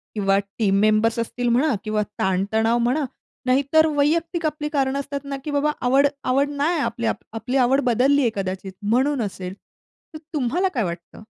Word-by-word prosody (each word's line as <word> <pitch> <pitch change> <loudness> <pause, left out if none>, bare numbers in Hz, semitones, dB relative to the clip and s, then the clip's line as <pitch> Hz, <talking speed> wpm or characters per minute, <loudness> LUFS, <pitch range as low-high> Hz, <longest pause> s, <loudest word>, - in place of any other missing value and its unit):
किंवा 195 -1 +2
team 195 0 0
members 215 +2 +3
असतील 245 +1 -2
म्हणा 265 +4 +3
किंवा 215 -1 0 0.2
ताणतणाव 220 +5 +1
म्हणा 285 +4 +1 0.4
नाहीतर 280 +5 +3
वैयक्तिक 330 +3 +1
आपली 300 -1 -2
कारणं 275 -2 0
असतात 280 0 -4
ना 275 - -2
की 300 - -4
बाबा 290 +1 +1
आवड 275 +3 +4 0.2
आवड 275 +3 +2
नाही 295 +3 0
आपली 235 -4 -2 0.3
आपली 250 +5 -2
आवड 265 +2 +3
बदललीये 255 +2 +3
कदाचित 190 0 -4
म्हणून 255 +5 +1
असेल. 190 -3 -5 0.6
तर - - -6 0.2
तुम्हाला 300 +7 +1
काय 235 -5 0
वाटतं? 170 -1 -6
255 Hz, 160 wpm, -22 LUFS, 215-285 Hz, 0.6 s, आवड